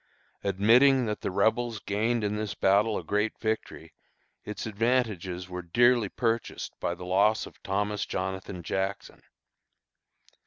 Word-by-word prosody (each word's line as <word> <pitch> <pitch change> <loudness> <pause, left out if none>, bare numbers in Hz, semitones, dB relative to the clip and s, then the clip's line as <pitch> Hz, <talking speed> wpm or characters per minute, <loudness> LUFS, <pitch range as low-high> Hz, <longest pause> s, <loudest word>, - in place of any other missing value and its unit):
Admitting 120 +7 +4
that 105 -1 -3
the - - -2
Rebels 110 +4 +1
gained 110 +4 0
in 105 0 -1
this 105 -1 -3
battle 105 +3 +3
a - - -5
great 105 +2 -1
victory, 110 -1 -4 0.5
its 105 - -6
advantages 105 -6 -1
were 90 -1 -5
dearly 120 +5 +3
purchased 115 +1 -2
by 85 - -2
the 90 +1 -9
loss 100 +4 +2
of - - -15
Thomas 105 +1 -1
Jonathan 95 -1 -4
Jackson. 95 +4 -3
105 Hz, 130 wpm, -28 LUFS, 95-115 Hz, 0.5 s, Admitting